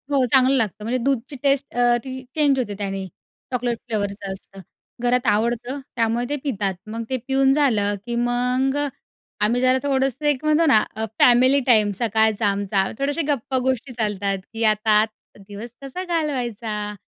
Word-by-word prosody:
हो, 275 -2 +3
चांगलं 265 0 +5
लागतं 215 -3 -1
म्हणजे 235 +4 -1
दूधची 270 +1 -1
टेस्ट 275 0 +1
अ, 240 0 +4
ती 260 -1 -6
चेंज 290 -3 +3
होते 220 -5 -2
त्यानी 195 -1 -4 0.4
चॉकलेट 245 -2 -1
फ्लेवरचं 200 -2 -3
असतं 195 0 -13 0.4
घरात 245 0 +1
आवडतं 240 +5 0 0.2
त्यामुळे 230 +1 0
ते 290 - 0
पितात. 205 -9 -1
मग 225 +2 -4
ते 260 - 0
पिऊन 270 0 +3
झालं 220 -9 +2
की 240 -1 -3
मग 250 +3 +1
अ, 290 0 0 0.6
आम्ही 240 +3 +1
जरा 255 0 +4
थोडंसं 270 0 0
एक 290 -2 +1
म्हणतो 305 +2 +3
ना 220 -7 +6 0.4
फॅमिली 255 +3 +5
टाईम, 215 -4 +4
सकाळचा 220 -1 +2
आमचा 200 -1 +1 0.2
थोडेसे 285 +4 0
गप्पा 265 -2 -1
गोष्टी 260 0 -1
चालतात, 205 -4 -1 0.2
की 225 0 -3
आता 215 0 +3 0.4
दिवस 205 +4 -10
कसा 275 +7 -6
घालवायचा, 240 - -2
245 Hz, 160 wpm, -22 LUFS, 215-270 Hz, 0.6 s, ना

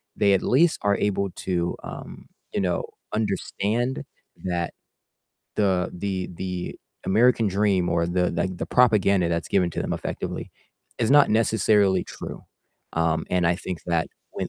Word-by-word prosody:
they 100 -1 +4
at 95 - +3
least 160 +7 +3
are 100 0 +3
able 100 -1 0
to, 85 -1 -2
um, - - -8 0.3
you - - 0
know, 90 -2 0 0.3
understand 110 +3 -1 0.4
that 85 -2 -1 0.9
the 95 -4 +2
the 95 0 -3
the 90 -1 -4 0.3
American 115 +2 +4
dream 95 -2 +2
or 85 0 +1
the, 90 0 +1
like, 90 +2 -1
the - - -4
propaganda 100 -7 +4
that's 85 -1 -1
given 90 -3 +2
to - - -4
them - - -2
effectively - - -4 0.5
is 115 0 +1
not 145 -4 +6
necessarily 105 -4 +3
true. - - -8 0.5
Um, 80 -1 +1
and 90 -2 +2
I 85 - +3
think 90 -2 -5
that 85 -2 +1 0.2
when, - - -3
95 Hz, 150 wpm, -25 LUFS, 90-105 Hz, 0.9 s, not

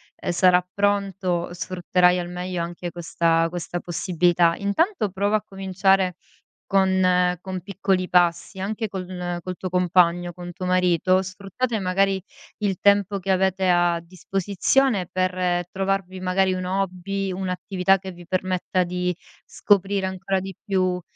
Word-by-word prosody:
ehm, - - -3
sarà 180 0 +4
pronto 195 -3 0
sfrutterai 180 0 +2
al 175 0 -4
meglio 180 -1 -3
anche 175 +1 -5
questa 165 -1 +1
questa 175 0 -5
possibilità. 175 -1 +2
Intanto 215 - 0
prova 200 +3 0
a 210 - -8
cominciare 190 -1 +1 0.6
con 185 -2 +3
con 185 -1 -5
piccoli 190 -1 -1
passi, 175 +2 +2
anche 215 +4 -2
con 180 -2 -4
col 185 +1 -5
tuo 185 - -4
compagno, 175 -1 +2
con 175 0 -8
tuo 185 +1 -5
marito, 185 +1 +3
sfruttate 200 +5 -3
magari 195 +1 +1 0.4
il 200 -3 -1
tempo 200 0 +3
che 195 0 -2
avete 190 0 +1
a 175 -1 +3
disposizione 195 +5 0
per 180 -1 0
trovarvi 195 -1 -2
magari 185 +1 +1
un 185 0 -3
hobby, 195 +1 -2
un'attività 185 +1 0
che 190 0 -8
vi 175 -1 -13
permetta 185 0 0
di 180 0 -1 0.4
scoprire 200 -1 +1
ancora 190 +1 -2
di 190 +1 -6
più 185 -3 0
185 Hz, 135 wpm, -23 LUFS, 180-195 Hz, 0.6 s, sarà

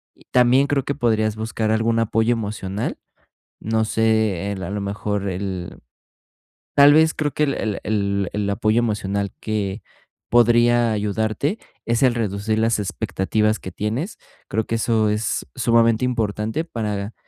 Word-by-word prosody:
Y - - -23
también 125 +2 +4
creo 140 -2 0
que 140 - -3
podrías 110 -4 +1
buscar 110 0 -2
algún 115 +1 +1
apoyo 115 +1 +2
emocional, 105 -2 -3 0.6
no 110 0 0
sé, 110 -4 +1
el 95 -1 -6
a 95 - -4
lo 105 - -3
mejor 100 0 -3
el, 95 -1 -5 1.0
tal 145 +1 +8
vez 160 +1 +5
creo 150 -1 -1
que 150 - 0
el 140 -2 +1
el 105 -2 -2
el 100 -3 0
el 100 -1 -1
apoyo 110 +2 +1
emocional 100 -3 -1
que 105 -1 -3 0.5
podría 120 0 +4
ayudarte 110 - -1 0.3
es 115 +2 +1
el 125 -2 +4
reducir 110 -1 -1
las 115 -1 +2
expectativas 105 +2 -1
que 95 - -7
tienes. 115 - -3 0.3
Creo 110 +2 -1
que 115 - -2
eso 110 -1 +1
es 105 0 -1
sumamente 115 -1 +3
importante, 110 +2 -1
para 105 -6 -4
110 Hz, 150 wpm, -22 LUFS, 105-120 Hz, 1.0 s, tal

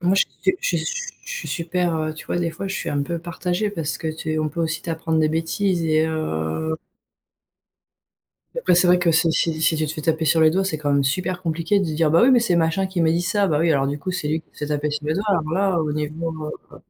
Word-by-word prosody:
Moi, 185 +2 +2
je 195 - +4 0.3
s - - -3
je - - 0 0.5
je - - -10
suis - - -6
super, 175 0 -1
heu 155 0 -2
tu 160 - -10
vois, - - -1
des 170 -1 0
fois, 195 - -6
je 195 - -3
suis - - -3
un 145 -1 0
peu 170 +4 -3
partagée 175 +4 -2
parce 165 -6 -3
que 160 - -3
tu 155 0 -3
on 155 0 0
peut 165 +3 -5
aussi 160 -1 -1
t'apprendre 165 -1 -1
des 155 - +3
bêtises 170 +3 0
et 155 0 +3
heu 155 - -2 1.8
et - - -3
après, 485 - +3
c'est 180 +1 +4
vrai 180 0 +5
que 175 -1 +2
si 165 +1 +3
si 160 -1 0
si 160 0 +3
tu 155 - 0
te 150 - -3
fais 155 - -6
taper 160 0 +1
sur 160 +1 +3
les 155 - +6
doigts, 190 +4 +1
c'est 160 -5 -2
quand 145 -1 0
même 140 -1 +3
super 180 +5 -1
compliqué 165 +4 +1
de 195 - 0
dire: 160 -1 +1
«Bah 165 +2 +5
oui, 250 - +6
mais 250 -2 +6
c'est 180 -7 +2
machin 170 +4 +1
qui 190 -2 -3
m'a 160 -1 +3
dit 170 +2 +2
ça», 200 +3 +1
bah 150 - +2
oui, 165 0 +3
alors 135 -2 +2
du 145 +1 -2
coup, 185 - -4
c'est 165 -5 -2
lui 155 +1 0
qui - - -36
se - - -19
fait - - -5
taper 150 0 -1
sur 150 0 -4
le 155 - +1
doigt 200 +5 -2
alors 165 -6 +1
là, 190 0 +2
au 150 -2 -1
niveau, 155 +1 -4 0.2
heu - - -11
165 Hz, 275 wpm, -22 LUFS, 155-180 Hz, 1.8 s, les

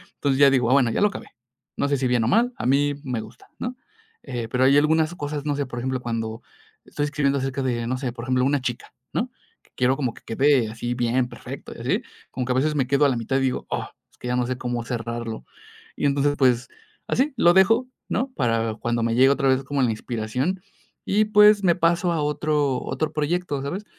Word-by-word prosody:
Entonces 140 -2 0
ya 140 -1 +8
digo: 125 -3 +2
"Ah, - - +5
bueno, 135 -4 +4
ya - - -1
lo 205 - +6
acabé". - - -9 0.5
No 140 - +1
sé 140 - +2
si 130 - 0
bien 125 -2 +2
o - - 0
mal. 235 - +3
A - - -4
mí 145 +2 +2
me 125 -5 -3
gusta, 110 0 -14
¿no?, 245 +1 -4 0.5
eh, 120 -2 -4
pero 125 0 +2
hay 135 +1 +5
algunas 155 +2 +3
cosas, 145 -2 -4
no 145 -1 0
sé, 140 0 -1
por 120 - -8
ejemplo, 130 +1 -2
cuando 115 -2 -4 0.4
estoy 145 - -2
escribiendo 140 -1 0
acerca 135 +1 -2
de 120 -2 -1
no 130 +1 -1
sé, 130 -3 -2
por 120 -1 -8
ejemplo, 130 0 +1
una 140 +1 +2
chica, 120 -2 -5 0.2
¿no? - - -1 0.5
Quiero 125 +1 +2
como 130 -5 -1
que - - -17
quede 130 -1 +2
así 120 +2 -4
bien, 120 +1 +1
perfecto 120 - -9
y - - -10
así, - - 0 0.3
como 125 - -3
que 125 - 0
a - - -3
veces 150 +4 +2
me 135 -3 +1
quedo 140 +2 +3
a 140 - +4
la 125 - 0
mitad 115 +4 -1
y - - +1
digo: 130 -1 -1
"¡oh!, - - -3 0.2
es - - -28
que - - -7
ya 125 - 0
no 125 - +1
sé 130 - -2
cómo 120 -2 -3
cerrarlo". 115 -2 -4 0.5
Y - - -2
entonces 145 +1 +2
pues 125 -2 +3 0.4
así 275 +2 +1
lo 175 -4 +5
dejo, 225 +7 +4 0.2
¿no? 260 +2 -1
Para 115 -3 0
cuando 120 +1 -2
me 115 0 0
llegue 130 +2 +6
otra 140 0 +2
vez 130 +1 +2
como 140 +1 -1
la 120 - +2
inspiración, 125 - -3 0.5
y 210 +2 +3
pues 210 -1 +6
me 175 -3 +4
paso 170 0 +2
a 160 - -1
otro 150 -2 0
otro 155 - -3
proyecto, 150 -1 -1
¿sabes? 180 +10 -4
135 Hz, 235 wpm, -23 LUFS, 120-150 Hz, 0.5 s, ya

